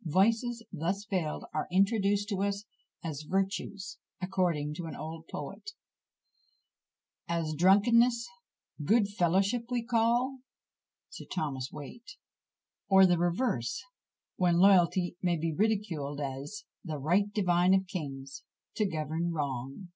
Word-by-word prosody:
Vices, 225 - +2
thus 185 +5 -2
veiled, 180 -8 -2
are 155 - -1
introduced 200 +1 +2
to 195 -3 -1
us 200 +1 -1 0.4
as 155 -3 -4
virtues, 195 +1 -2 0.2
according 175 -6 0
to 165 +2 -6
an 160 - -6
old 160 +1 -7
poet, 425 - -7 1.5
As 165 -2 -1
drunkenness, 230 +7 +4 0.6
good 210 +6 +4
fellowship 200 +5 +1
we 245 -2 -1
call? 240 +3 +1 0.7
SIR - - -9
THOMAS 140 -7 -2
WIAT. 150 - -10 0.8
Or 190 -1 +8
the 175 -2 +3
reverse, 175 - 0 0.5
when 175 -2 +3
loyalty 180 -1 +4
may 175 -2 +1
be 160 0 -1
ridiculed, 175 -8 -1
as 140 +8 -5 0.2
The 155 -4 -4
right 180 +9 +1
divine 180 -2 +3
of 190 0 +1
kings 140 -7 -6 0.4
to 215 - +2
govern 160 +2 -2
wrong! 140 +2 -4
185 Hz, 120 wpm, -30 LUFS, 160-205 Hz, 1.5 s, Or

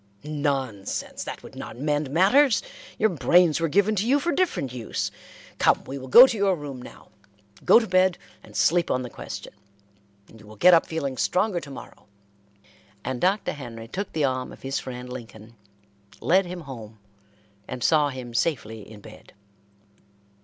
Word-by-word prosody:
"Nonsense! 140 -9 -3
That - - -7
would - - -12
not - - -8
mend 145 +1 -1
matters. 205 - +4 0.3
Your 220 - +3
brains 170 +2 +3
were 165 - +1
given 200 +6 +2
to 205 +4 0
you 280 +3 +4
for 340 +5 -1
different 330 - -1
use. 120 -3 -3 0.5
Come, - - +3
we 135 +1 -7
will 130 - -9
go 240 - +10
to 255 - -1
your 200 -2 +2
room 145 -5 -8
now. - - -13 0.6
Go - - +8
to 235 - -3
bed 185 -2 +3 0.2
and - - -16
sleep 175 0 +2
on 130 - 0
the 125 - -8
question, - - -8 0.7
and 110 - -17
you 105 - -16
will 110 - -12
get 180 - +6
up 165 - +4
feeling 140 -5 -3
stronger 185 - +1
to 145 - -11
morrow;" 135 - -12 1.0
and 130 -1 -3
Dr. 195 +3 +1
Henry 115 -6 -9
took 195 - -5
the 155 -3 +1
arm 130 -1 -2
of - - -14
his 135 +1 -2
friend 125 -1 -7
Lincoln, 115 -2 -10 0.6
led 185 +1 +2
him 175 0 -6
home, 115 -7 -10 0.7
and 125 -2 -6
saw 150 -2 +3
him 130 -3 -8
safely 110 -4 -1
in 105 -2 -12
bed. - - -15
145 Hz, 175 wpm, -25 LUFS, 125-180 Hz, 1.0 s, go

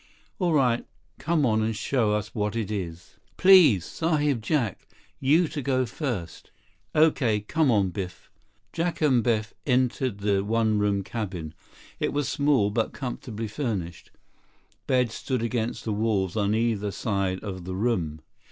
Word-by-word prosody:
"All 180 -3 +1
right. 125 -5 +2 0.4
Come 155 +1 +1
on 110 -2 +2
and 110 0 -1
show 110 -1 +1
us 105 +1 -4
what 105 -1 -2
it 110 -3 -2
is." 90 -4 -6 0.2
"Please, 170 - +7
Sahib 150 -6 0
Jack. 115 - -1 0.3
You 155 +6 +3
to 150 - -4
go 130 -1 +1
first." 115 - -5 0.5
"Okay. 140 -9 +3
Come 155 +7 +1
on, 100 -5 +2
Biff." 95 0 -7 0.4
Jack 170 +1 -1
and 130 -6 +3
Biff 110 -1 0
entered 125 -3 +1
the 100 -1 +1
one 110 0 +1
room 100 -1 +1
cabin. 95 -8 -5 0.5
It - - -1
was 145 -1 0
small, 140 -8 +2
but 115 +1 -1
comfortably 120 -4 -5
furnished. 105 - -4 0.8
Beds 125 -3 +2
stood 130 -4 -2
against 115 -1 -2
the 110 - -1
walls 100 -4 0
on 105 0 +1
either 110 -3 0
side 100 -2 -1
of 95 -4 -6
the 95 0 -4
room. 90 -8 -1
115 Hz, 150 wpm, -26 LUFS, 100-130 Hz, 0.8 s, Please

